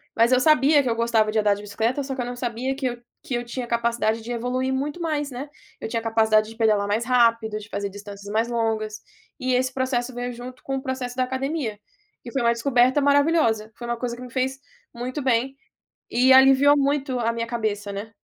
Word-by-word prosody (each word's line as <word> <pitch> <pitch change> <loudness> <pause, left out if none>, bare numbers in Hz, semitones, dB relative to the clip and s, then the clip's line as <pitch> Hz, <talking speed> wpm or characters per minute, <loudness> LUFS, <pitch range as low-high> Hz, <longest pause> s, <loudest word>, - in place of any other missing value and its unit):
Mas 230 +2 +4
eu 255 - +5
sabia 290 -1 +5
que 250 - -1
eu 230 - 0
gostava 230 -2 +2
de 220 - +1
andar 205 -1 +3
de 205 - -9
bicicleta 225 +7 -1
só 270 0 -4
que 260 - -10
eu - - -2
não 245 0 -5
sabia 245 +2 -3
que 270 -1 -4
eu 245 - -4 0.2
que 260 - -6
eu 240 - -2
tinha 240 +1 -5
capacidade 235 -1 0
de 240 +2 -7
evoluir 250 +2 -1
muito 290 +5 -3
mais, 300 -3 -1
né, 270 +4 -6 0.3
eu - - -5
tinha 230 0 -1
capacidade 220 -1 +2
de 225 - -11
pedalar 215 -3 +2
mais 220 +3 0
rápido, 230 -3 +2
de 215 +1 -10
fazer 200 0 -3
distâncias 200 0 -10
mais 225 +2 +1
longas, 220 -2 -2 0.4
e 255 0 0
esse 255 +1 +1
processo 260 -1 -1
veio 245 0 -4
junto 250 +1 -9
com 270 - -3
o - - -4
processo 260 -2 -4
da 255 - +2
academia. 260 -3 -3 0.5
E 235 - -7
foi 270 - 0
uma 235 - +3
descoberta 250 +2 +3
maravilhosa, 285 -7 +2
foi 240 - -8
uma 240 0 -2
coisa 240 -1 -3
que - - -11
me 250 -1 -9
fez 260 +1 -1 0.4
muito 255 +4 -4
bem, 260 +1 +1 0.6
e 255 +2 +3
aliviou 270 +2 +7
muito 275 -2 0
a 230 -1 0
minha 230 0 -3
cabeça, 215 -3 -3
né. 205 +3 -6
245 Hz, 225 wpm, -24 LUFS, 225-265 Hz, 0.6 s, aliviou